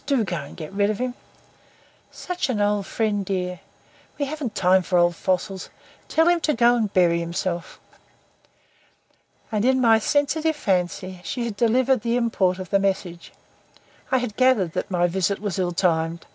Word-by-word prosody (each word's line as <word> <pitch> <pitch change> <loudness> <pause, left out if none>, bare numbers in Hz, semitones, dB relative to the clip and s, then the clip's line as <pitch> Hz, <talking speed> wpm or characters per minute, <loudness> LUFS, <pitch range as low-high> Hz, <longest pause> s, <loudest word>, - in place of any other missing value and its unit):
Do 275 -5 +2
go 180 -4 -3
and 140 -2 -9
get 155 +4 -8
rid 200 +1 +2
of 215 - -1
him." 250 +1 -2 1.0
"Such 360 -5 -4
an 230 -5 -1
old 205 -1 +1
friend, 210 -3 -1
dear." 180 -2 -3 0.6
"We 285 - -1
haven't 275 -6 -5
time 185 0 +4
for 180 0 0
old 175 0 +3
fossils. 190 +1 -2 0.4
Tell 325 +1 +2
him 345 0 +4
to 305 -2 0
go 240 +1 +5
and 220 -4 -1
bury 175 -3 +3
himself." 170 +1 -4 1.7
And 215 -1 0
(in 260 +1 +3
my 225 -3 +5
sensitive 305 +6 +1
fancy) 185 -4 -2
she 245 +3 -3
had 225 -3 -4
delivered 250 +3 +2
the 235 +1 0
import 195 -6 +1
of 185 -2 -8
the 195 - +4
message. 190 -3 -2 0.8
I 260 - +4
had 245 -4 -3
gathered 255 -10 +3
that - - -3
my 175 -2 +1
visit 190 +3 0
was 200 -2 -3
ill 180 -1 0
timed. 165 -2 0
200 Hz, 175 wpm, -23 LUFS, 180-245 Hz, 1.7 s, go